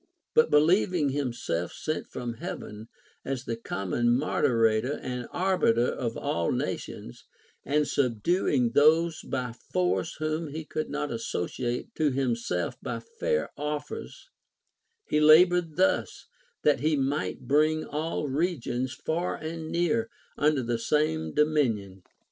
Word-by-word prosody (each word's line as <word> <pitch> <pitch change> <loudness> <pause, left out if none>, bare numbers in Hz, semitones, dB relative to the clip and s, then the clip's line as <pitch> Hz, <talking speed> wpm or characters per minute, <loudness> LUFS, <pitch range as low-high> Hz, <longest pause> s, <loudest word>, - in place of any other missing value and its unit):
But 470 - +5
believing 165 0 +3
himself 120 -11 -2
sent 155 0 -3
from 120 -1 -5
Heaven 110 -1 -7 0.4
as 130 -2 -3
the 115 - -2
common 115 +1 -1
moderator 115 -3 +2
and 125 -1 -5
arbiter 175 -11 +2
of 120 -2 -2
all 85 0 -1
nations, - - -4 0.4
and 150 +1 +1
subduing 125 - +1
those 160 +4 +4
by 125 -2 -3 0.2
force 90 +1 0
whom 155 +1 -2
he 155 +2 -6
could 155 0 -3
not 150 - -3
associate 120 +2 -3
to 155 -2 +3
himself 120 -9 -1
by - - -4 0.2
fair 475 -1 0
offers, 150 - -5 0.7
he 150 - +1
labored 165 +1 +6
thus, 95 - +1 0.4
that 150 - +4
he 155 +1 +2
might 140 +2 -1
bring 155 +2 +2
all 155 0 -2
regions, 130 -4 -1
far 160 +4 -2
and 160 0 -6
near, 225 +7 +1 0.3
under 150 -3 +2
the 120 0 -1
same 95 - 0
dominion. 115 - +1
145 Hz, 125 wpm, -28 LUFS, 120-155 Hz, 0.7 s, labored